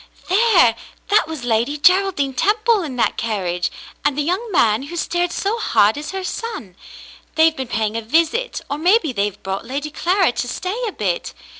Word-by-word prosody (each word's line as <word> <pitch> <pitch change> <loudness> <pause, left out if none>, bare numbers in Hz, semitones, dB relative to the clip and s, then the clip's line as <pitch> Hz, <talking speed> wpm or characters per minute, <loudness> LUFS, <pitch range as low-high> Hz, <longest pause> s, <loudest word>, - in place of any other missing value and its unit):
"There, 375 - +5 0.4
that 415 -4 +4
was 315 -5 -6
Lady 240 +5 0
Geraldine 360 -4 +3
Temple 430 - +2
in 290 -7 -5
that 245 - 0
car 215 -4 -2
riage, 175 0 -1 0.3
and 290 -1 +1
the 295 - +1
young 375 +8 -2
man 225 - +3
who 285 +5 -8
stared 350 +1 -1
so 415 +6 -2
hard 215 - +3
is 295 +1 -6
her 385 0 -4
son. 370 - -5 0.6
They've 320 0 +4
been 265 -4 -4
paying 220 -1 -1
a 230 - -1
visit, 330 - 0
or 285 - -4
maybe 355 - +3
they've 205 -1 -2
brought 190 0 -3
Lady 280 +5 -4
Clara 360 0 +2
to 245 - -3
stay 370 - -4
a - - -3
bit. - - -3
300 Hz, 185 wpm, -20 LUFS, 230-385 Hz, 0.6 s, There